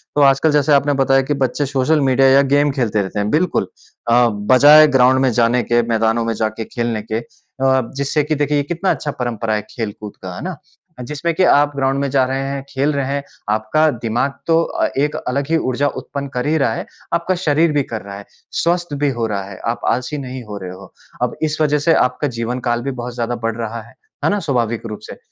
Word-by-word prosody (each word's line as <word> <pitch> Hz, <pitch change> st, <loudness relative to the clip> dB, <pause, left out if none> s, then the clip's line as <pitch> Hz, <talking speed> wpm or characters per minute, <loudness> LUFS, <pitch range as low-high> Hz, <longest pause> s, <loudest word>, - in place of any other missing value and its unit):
तो 145 Hz, -, +3 dB
आजकल 140 Hz, +3 st, +4 dB
जैसे 145 Hz, 0 st, +3 dB
आपने 145 Hz, +1 st, +3 dB
बताया 135 Hz, 0 st, +3 dB
कि 135 Hz, +2 st, -1 dB
बच्चे 145 Hz, +3 st, -2 dB
सोशल 140 Hz, +3 st, +1 dB
मीडिया 135 Hz, 0 st, +4 dB
या 135 Hz, +1 st, +6 dB
गेम 145 Hz, 0 st, +3 dB
खेलते 115 Hz, -6 st, 0 dB
रहते 100 Hz, +2 st, -4 dB
हैं, 105 Hz, 0 st, -1 dB
बिल्कुल। 165 Hz, +3 st, +1 dB, 0.4 s
अ, -, -, +4 dB, 0.4 s
बजाय 150 Hz, +4 st, +8 dB
ग्राउंड 130 Hz, +1 st, +5 dB
में 130 Hz, -2 st, +3 dB
जाने 120 Hz, +1 st, +2 dB
के, 120 Hz, 0 st, +2 dB
मैदानों 115 Hz, 0 st, +1 dB
में 115 Hz, -, 0 dB
जाके 110 Hz, 0 st, -3 dB
खेलने 115 Hz, -2 st, -2 dB
के, 110 Hz, +1 st, -3 dB
अ, 130 Hz, +1 st, -2 dB
जिससे 140 Hz, +2 st, 0 dB
कि 155 Hz, +2 st, -1 dB
देखिए 145 Hz, 0 st, 0 dB
ये 145 Hz, -, +1 dB
कितना 175 Hz, +6 st, -1 dB
अच्छा 145 Hz, -, -2 dB
परंपरा 115 Hz, -3 st, -2 dB
है 105 Hz, -, -1 dB
खेलकूद 105 Hz, -2 st, -6 dB
का। 90 Hz, -1 st, -7 dB
है -, -, -7 dB
ना? 180 Hz, -2 st, -5 dB, 0.5 s
जिसमें 150 Hz, +6 st, -2 dB
कि 185 Hz, -, +2 dB
आप 145 Hz, -4 st, +4 dB
ग्राउंड 135 Hz, 0 st, 0 dB
में 140 Hz, 0 st, -1 dB
जा 135 Hz, 0 st, +3 dB
रहे 135 Hz, +1 st, -2 dB
हैं, 140 Hz, 0 st, -3 dB
खेल 140 Hz, +3 st, 0 dB
रहे 140 Hz, -1 st, -1 dB
हैं, 140 Hz, 0 st, -2 dB, 0.3 s
आपका 110 Hz, +9 st, +2 dB
दिमाग 120 Hz, +5 st, 0 dB
तो 165 Hz, 0 st, +4 dB
अ, -, -, -1 dB
एक 150 Hz, +2 st, +1 dB
अलग 140 Hz, +2 st, -1 dB
ही 165 Hz, -, +3 dB
ऊर्जा 135 Hz, -1 st, 0 dB
उत्पन्न 140 Hz, -1 st, -6 dB
कर 125 Hz, 0 st, -2 dB
ही 160 Hz, +1 st, +2 dB
रहा 135 Hz, -6 st, +1 dB
है। -, -, -5 dB, 0.3 s
आपका 170 Hz, +2 st, +1 dB
शरीर 155 Hz, +2 st, +3 dB
भी 145 Hz, -1 st, +1 dB
कर 115 Hz, -3 st, -6 dB
रहा 100 Hz, 0 st, -9 dB
है, 100 Hz, -, -11 dB, 0.3 s
स्वस्थ 175 Hz, -2 st, 0 dB
भी 145 Hz, -, +3 dB
हो 115 Hz, -, +1 dB
रहा 100 Hz, -2 st, -3 dB
है। 95 Hz, -, -9 dB
आप 120 Hz, -, -6 dB
आलसी 125 Hz, +5 st, -2 dB
नहीं 130 Hz, -2 st, -6 dB
हो 105 Hz, -2 st, -7 dB
रहे 95 Hz, -2 st, -7 dB
हो। 95 Hz, +1 st, -13 dB, 0.3 s
अब -, -, -1 dB
इस 155 Hz, 0 st, 0 dB
वजह 150 Hz, -1 st, +2 dB
से 165 Hz, -, +6 dB
आपका 125 Hz, +2 st, +1 dB
जीवनकाल 120 Hz, 0 st, -1 dB
भी 135 Hz, -, -3 dB
बहुत 125 Hz, 0 st, -6 dB
ज़्यादा 120 Hz, 0 st, -2 dB
बढ़ 115 Hz, -1 st, -1 dB
रहा 115 Hz, 0 st, -4 dB
है, 110 Hz, -, -17 dB, 0.3 s
है -, -, +4 dB
ना? 205 Hz, -, +1 dB
स्वाभाविक 120 Hz, -, -1 dB
रूप 105 Hz, -1 st, -6 dB
से। -, -, -8 dB
130 Hz, 230 wpm, -18 LUFS, 115-145 Hz, 0.5 s, बजाय